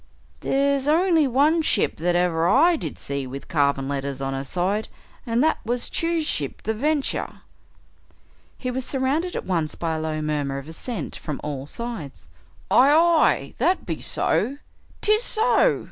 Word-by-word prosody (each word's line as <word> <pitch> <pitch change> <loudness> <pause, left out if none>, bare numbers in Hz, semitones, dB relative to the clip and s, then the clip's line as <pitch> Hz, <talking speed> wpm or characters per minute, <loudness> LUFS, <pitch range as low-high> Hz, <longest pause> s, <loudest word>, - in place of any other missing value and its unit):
"There's 280 0 +1
only 325 -1 +3
one 290 +6 +3
ship - - 0
that 175 +2 0
ever 170 -2 +2
I 315 - +5
did - - -5
see 140 -1 -4
with 135 +2 -8
carven 140 -4 +1
letters 140 -1 -3
on 135 0 -3
her 135 0 -3
side, 185 +9 -1 0.4
and 235 +3 +2
that 315 - +2
was 240 +2 -1
Chew's 330 -1 0
ship, 145 - -2
the 220 - -1
Venture." 285 +5 -2 1.2
He 255 - -3
was 260 +1 -2
surrounded 280 +8 -1
at - - -4
once 165 -5 -1
by 165 -1 -2
a - - -3
low 155 0 -3
murmur 145 -3 -2
of 140 +1 -8
assent 165 - -5
from 150 -3 -5
all 140 -2 -5
sides. 215 - -7 0.4
"Aye 265 +3 +6
aye!" 330 +1 +3
"That 370 - +1
be - - -4
so!" 275 +3 +1 0.5
"'Tis 430 +1 +4
so!" 470 0 +3
220 Hz, 160 wpm, -23 LUFS, -, 1.2 s, Aye